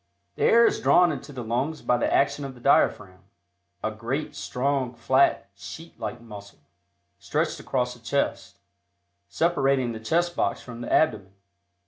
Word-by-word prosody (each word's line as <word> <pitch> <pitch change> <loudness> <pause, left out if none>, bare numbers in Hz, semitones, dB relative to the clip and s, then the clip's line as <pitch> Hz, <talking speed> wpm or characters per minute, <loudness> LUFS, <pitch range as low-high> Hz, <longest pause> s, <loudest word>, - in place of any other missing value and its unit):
The - - -1
air 235 +1 +6
is - - +2
drawn 175 -1 +4
into 145 0 -7
the 130 -3 -6
lungs 130 +8 -2
by 125 - +2
the - - 0
action 140 +1 +2
of 135 -1 -6
the - - -15
diaphragm, 100 -7 +2 0.6
a 110 - -1
great, 120 +7 -4
strong, 130 -1 -2
flat, 130 -3 +2
sheet 100 +12 -11
like 120 - -5
muscle, 105 -3 -12 0.6
stretched - - -1
across 125 -1 -1
the 120 - -16
chest, 115 -4 -2 0.7
separating 135 - +1
the 110 - -6
chest 170 +10 0
box - - 0
from 120 -1 -10
the - - -5
abdomen. 100 -11 +1
125 Hz, 155 wpm, -25 LUFS, 115-140 Hz, 0.7 s, air